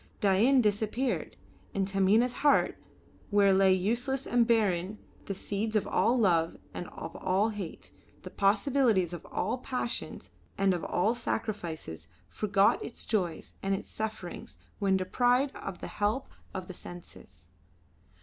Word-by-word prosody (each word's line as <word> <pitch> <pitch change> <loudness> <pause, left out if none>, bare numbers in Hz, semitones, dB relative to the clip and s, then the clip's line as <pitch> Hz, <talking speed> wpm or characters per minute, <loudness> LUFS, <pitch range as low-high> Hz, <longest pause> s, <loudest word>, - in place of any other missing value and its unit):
Dain 220 +7 +4
disappeared, 220 +4 -1 0.4
and 195 -1 +1
Taminah's 200 +5 +3
heart, 290 0 +4 0.5
where 200 -1 +5
lay 190 0 +5
useless 240 +8 0
and 240 -1 +3
barren 205 -4 +1 0.3
the 195 - -3
seeds 210 +3 -3
of 215 - +2
all 240 +3 +2
love 170 -7 +2 0.2
and 175 - -5
of 165 - -8
all 190 +4 +1
hate, 205 -6 -7 0.3
the - - -8
possibilities 205 - +2
of 175 - -6
all 230 +6 -2
passions 250 -2 -4 0.3
and 195 -1 +3
of 175 - -3
all 210 +6 +1
sacrifices, 170 - -4 0.2
forgot 200 -1 +2
its - - -4
joys 180 -7 -2
and 195 0 +1
its - - -7
sufferings 220 -5 -5 0.2
when 195 -2 +3
deprived 245 +8 +2
of 190 -3 -7
the - - -5
help 210 +6 -1 0.2
of 185 -1 -6
the 185 - -7
senses. 95 - -13
200 Hz, 140 wpm, -30 LUFS, 185-230 Hz, 0.5 s, where